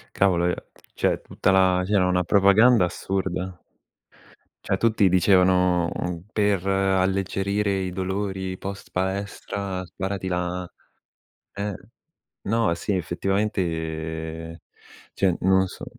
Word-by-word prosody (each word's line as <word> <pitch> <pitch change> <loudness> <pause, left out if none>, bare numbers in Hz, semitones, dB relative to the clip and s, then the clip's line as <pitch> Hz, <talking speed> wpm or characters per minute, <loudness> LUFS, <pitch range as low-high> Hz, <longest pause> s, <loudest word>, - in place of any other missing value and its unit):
Cavolo, 90 -3 +3
ehm, 90 - +1 0.4
cioè, - - 0
tutta 95 - 0
la 95 -1 +4
c'era 95 -2 +2
una 90 0 +2
propaganda 100 +4 +5
assurda. 95 0 -3 1.1
Cioè 95 - 0
tutti 110 -2 +3
dicevano, 90 -1 +3
uhm: 90 -1 -4
"Per 100 -3 +1
alleggerire 95 +1 +1
i 95 -1 -3
dolori 95 0 -3
post-palestra 100 0 -4
sparati 95 +2 -4
la" 90 0 -2 0.9
ehm 100 0 -3 0.7
no, 115 -2 +2
sì, 100 - -3
effettivamente, 80 -4 -2 0.5
cioè, 95 -3 +2
non 95 0 +4
lo 95 - +1
so. - - -9
95 Hz, 105 wpm, -24 LUFS, 90-100 Hz, 1.1 s, propaganda